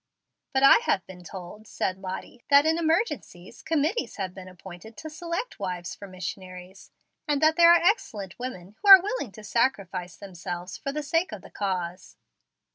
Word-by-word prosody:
"But 265 0 +1
I 275 - +9
have 190 - +1
been 180 -1 -12
told," 190 +4 -10
said 185 0 -2
Lottie, 190 +5 -7
"that 285 +1 +6
in 320 +1 +2
emergencies 320 - -2
committees 325 - -1
have 190 -3 -4
been 185 -1 -10
appointed 185 +4 -12
to 315 +6 -8
select 340 +8 -5
wives 175 -2 -4
for 200 - -10
missionaries, 185 0 -8 0.4
and 295 -1 +1
that 315 +1 +5
there 340 0 +7
are - - +8
excellent 215 - 0
women 210 -6 -7
who 405 - +1
are 385 -1 +13
willing 410 - -3
to 215 - -12
sacrifice 195 -7 -1
themselves 180 -1 -7
for 275 - -4
the 300 +1 -4
sake 330 +5 0
of - - -8
the - - -14
cause." 185 -3 -4
205 Hz, 175 wpm, -26 LUFS, -, 0.4 s, are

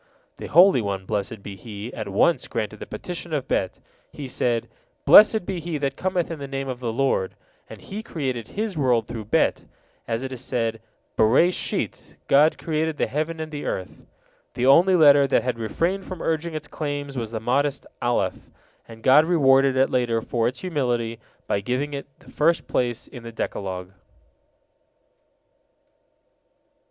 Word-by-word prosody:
'" - - -42
The - - -6
Holy 175 -4 +6
One, 100 -2 -3
blessed 105 0 -3
be 100 - -7
He, 105 +4 -8
at 105 - -5
once 105 - +2
granted 110 -1 -3
the - - -8
petition 175 -2 -6
of 140 - -3
Bet. 95 - -1 0.3
He 140 - -7
said, 120 -2 -1 0.4
"Blessed 215 -2 +8
be 190 -2 -3
he 165 -1 -3
that 140 -2 -2
cometh 185 -2 -1
in 165 - -5
the 140 - -6
name 135 0 -4
of 130 -2 -4
the 120 -3 -2
Lord." 120 -6 0 0.3
And - - -10
He 205 +3 -7
created 130 - -4
His 210 -2 -3
world 125 -6 +2
through 110 -2 -7
Bet, 105 - +1 0.4
as 115 +2 -2
it 135 - -5
is 130 -1 -6
said, 115 -3 -2 0.4
"Bereshit 130 +12 +1
God 150 +3 +5
created 160 -1 -2
the - - +1
heaven 155 +3 -3
and 155 0 -5
the 145 -1 -5
earth." 95 - -5 0.5
The 125 0 0
only 175 +8 +6
letter 145 -4 +6
that - - +2
had 125 -2 -2
refrained 170 - -1
from 185 -3 -6
urging 165 0 -2
its 155 - -5
claims 145 -2 -4
was 115 -4 -3
the 110 0 -4
modest 140 +5 0 0.2
Alef, 110 -6 -1 0.4
and 115 -1 -13
God 145 +4 +6
rewarded 135 -5 +4
it 135 +1 +3
later 120 -3 +1
for 115 0 -1
its 125 +1 -4
humility 120 -9 -1 0.3
by 100 - 0
giving 130 +7 -2
it 140 - -5
the - - -17
first 165 +3 +1
place 120 -1 -1
in 125 - -11
the 115 0 -8
Decalogue. 95 -4 -4
135 Hz, 170 wpm, -24 LUFS, 115-155 Hz, 0.5 s, Blessed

